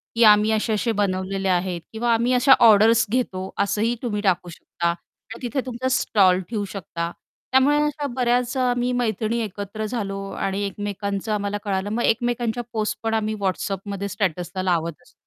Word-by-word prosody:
की 230 - +4
आम्ही 210 0 +6
असे 220 +1 0
असे 230 +2 0
बनवलेले 195 -2 -1
आहेत 180 -1 0
किंवा 235 +1 +1
आम्ही 235 +2 +2
अशा 260 +2 +6
ऑर्डर्स 220 +1 +6
घेतो 190 -7 -1
असंही 215 +4 0
तुम्ही 210 -4 -2
टाकू 185 -3 +1
शकता 170 0 -3
आणि 175 +6 -9
तिथे 255 +3 -1
तुमचा 255 0 -3
स्टॉल 190 -7 +3
ठेऊ 215 -3 -2
शकता. 170 -3 -5 0.4
त्यामुळे 265 +3 +4
अशा 295 -1 -2
बऱ्याच 245 0 +1
अ, - - +1
आम्ही 245 0 +1
मैत्रिणी 230 -1 0
एकत्र 205 +1 -5
झालो 200 -3 -3
आणि 195 +1 -2
एकमेकांचं 200 +1 -4
आम्हाला 205 0 -1
कळालं 195 -1 -1
मग 235 +2 -1
एकमेकांच्या 240 0 0
पोस्ट 215 -1 -1
पण 225 0 0
आम्ही 215 -1 0
WhatsAppमध्ये 195 +1 -2
स्टेटसला 185 -2 -2
लावत 170 -4 -1
असतो. - - -24
210 Hz, 165 wpm, -23 LUFS, 195-235 Hz, 0.4 s, आम्ही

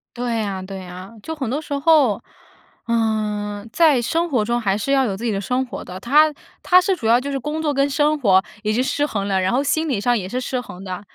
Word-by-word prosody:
对 235 -2 -1
啊 195 -2 -3
对 190 0 -7
啊， 185 +4 -10
就 320 - -4
很 270 -7 -4
多 285 +5 -2
时 295 - -6
候， 280 -7 +3 0.6
呃， 215 -2 -1
在 310 -7 +4
生 335 +8 0
活 250 -8 +1
中 235 +3 0
还 200 -4 0
是 215 +6 -2
要 270 -1 +3
有 200 -5 -2
自 210 - -9
己 235 - 0
的 195 - -1
生 250 +6 -1
活 245 - -8
的， 180 - -8
他 300 +6 +4 0.3
他 365 0 +5
是 380 +1 +1
主 225 - -3
要 230 +1 +6
就 280 +2 -5
是 275 - -2
工 300 +4 -3
作 300 -2 0
跟 275 +1 +1
生 295 +2 +1
活 190 -7 +4 0.2
已 215 0 0
经 245 +3 +1
失 290 +2 0
衡 205 -9 -3
了， 190 -1 +2
然 185 +3 0
后 265 +3 +2
心 315 +3 0
理 245 -9 -1
上 245 +2 +2
也 185 -3 -4
是 250 +5 -3
失 255 0 -2
衡 190 -6 -9
的， 185 -2 -5
240 Hz, 275 characters per minute, -21 LUFS, 205-285 Hz, 0.6 s, 要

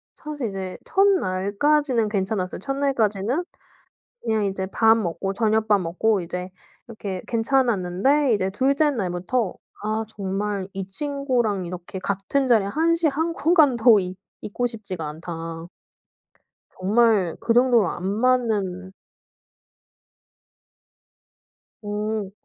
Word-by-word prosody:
사실 295 -6 -5
이제 190 -2 -5
1 390 +1 +3
날까지는 235 - +1
괜찮았어요. 195 -2 -2
1 275 - -3
날까지는 245 - 0 0.8
그냥 220 -2 0
이제 190 -1 -2
밥 225 +3 +4
먹고 195 -2 -2
저녁밥 220 -1 +2
먹고 185 +5 +1
이제 180 +1 -5 0.4
이렇게 200 -5 -5
괜찮았는데 240 +2 +2
이제 190 -2 0
2 260 +8 +1
째 300 +1 +3
날부터 190 -1 -1 0.3
아 215 +1 -1
정말 200 -1 -3
이 195 -1 -5
친구랑 250 -5 -1
이렇게 180 +2 -7
같은 200 +9 -1
자리에 220 -5 +4
한시 330 +7 +1
한 320 +4 -1
공간도 270 - +5
있 185 0 -5 0.2
있고 245 +4 -2
싶지가 195 -9 -6
않다. 165 +1 -7 1.1
정말 205 -2 +3
그 230 - +1
정도로 240 -5 +4
안 180 - -5
맞는 205 -4 0 2.9
어. 210 -1 -3
215 Hz, 225 characters per minute, -23 LUFS, 190-255 Hz, 2.9 s, 공간도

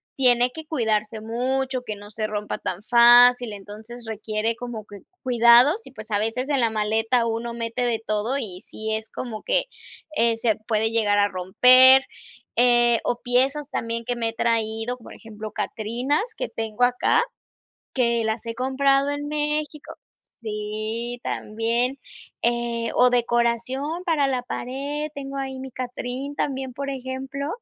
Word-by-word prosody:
tiene 250 -2 +4
que 320 -1 -8
cuidarse 220 -7 -1
mucho, 255 +3 -2
que 215 -3 -5
no 205 +1 -13
se 215 0 -3
rompa 210 -1 -4
tan 185 +3 -5
fácil. 240 0 +6
Entonces 215 +4 -10
requiere 220 +1 -2
como 235 -3 -7
que 205 -1 -12 0.2
cuidados 245 - +5
y, - - -12
pues, 215 -3 -11
a 205 - +2
veces 250 +6 -2
en 280 -2 +1
la 230 -2 +3
maleta 220 +2 +1
uno 230 +1 -3
mete 235 +1 -4
de 235 -2 0
todo 215 +6 -1
y 190 -7 -5
si 220 0 -5
es 220 0 -6
como 230 -4 -6
que, - - +1 0.5
eh, 230 -2 +2
se 225 -2 +1
puede 220 0 +1
llegar 210 -3 +2
a 205 0 +4
romper, 255 +9 +7 0.5
eh, 240 -1 +4
o 245 - -1
piezas 270 +4 +1
también 230 0 -3
que 245 - -2
me 230 -1 -1
he 225 - -7
traído, 225 +1 -1
por 230 - -13
ejemplo, 215 -1 -9
Catrinas 260 - -2
que - - -3
tengo 225 +1 -3
acá 250 - +3 0.7
que 235 -3 +1
las 220 +1 -2
he 230 - -5
comprado 275 +2 +2
en 290 0 -3
México 300 0 -3 0.3
Sí, 220 +2 -5
también, 235 +5 -1 0.4
eh, 235 -1 0
o 250 - +5
decoración 245 +6 0
para 310 -6 +2
la 260 -2 -1
pared. 280 +5 -4
Tengo 275 -1 -6
ahí 265 -1 -4
mi 265 0 -8
Catrín 255 +3 -5
también, 265 -3 -3
por 280 +1 -4
ejemplo, 270 +1 -5
240 Hz, 155 wpm, -23 LUFS, 220-265 Hz, 0.7 s, romper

